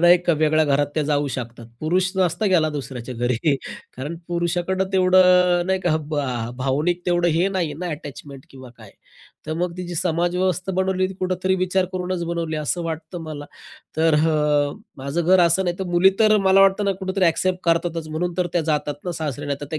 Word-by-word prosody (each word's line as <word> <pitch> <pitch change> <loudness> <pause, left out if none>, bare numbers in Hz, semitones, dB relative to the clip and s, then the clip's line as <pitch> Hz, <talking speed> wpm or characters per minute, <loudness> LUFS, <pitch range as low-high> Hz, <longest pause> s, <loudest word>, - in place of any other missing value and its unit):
नाही 175 +1 +8
का, 170 - +4
वेगळ्या 155 0 +2
घरात 145 0 +2
त्या 155 - +1
जाऊ 145 0 0
शकतात. 120 -2 -7
पुरुष 180 +4 +1
नसता 185 +3 +1
गेला 170 -5 +3
दुसऱ्याच्या 130 -4 -6
घरी. 120 +5 0 0.4
कारण 145 +6 -5
पुरुषाकडं 175 +2 -1
अ, - - -9
तेवढं 180 -1 +4
नाही 190 0 +1
का? 165 -4 +1
भा 125 -6 -2
भावनिक 150 +7 0
तेवढं 175 0 +2
हे 170 +4 +2
नाही 180 -6 -2
ना, 180 +3 -5
अटॅचमेंट 140 -2 -9
किंवा 130 -2 -12
काय. 110 -3 -14 0.6
तर 155 - -3
मग 175 +1 -2
ती 180 - -5
जी 175 - -6
समाजव्यवस्था 180 +2 0
बनवली, 190 0 +1
ती 190 - -8
कुठेतरी 185 0 -1
विचार 185 0 +1
करूनच 180 -1 -3
बनवली, 165 -2 -3
असं 155 +3 -2
वाटतं 165 +1 -5
मला. 150 -2 -7 0.5
तर 160 0 +3
हा 160 +1 +2 0.6
माझं 140 +5 -3
घर 185 +1 +5
असं 170 +2 +3
नाही 175 -1 -1
तर, 190 - -2
मुली 175 +2 +4
तर 215 -1 +5
मला 195 -1 +4
वाटतं 195 +1 +4
ना, 195 - +2
कुठेतरी 190 0 0
एक्सेप्ट 180 +2 +1
करतातच, 165 -1 0
म्हणून 175 +3 -2
तर 180 -1 +1
त्या 175 - +2
जातात 150 -1 0
ना 175 - -2
सासरी, 145 -3 -4
नाही 140 -1 -1
तर 145 - -6
त्या 155 - -2
170 Hz, 195 wpm, -22 LUFS, 150-185 Hz, 0.6 s, नाही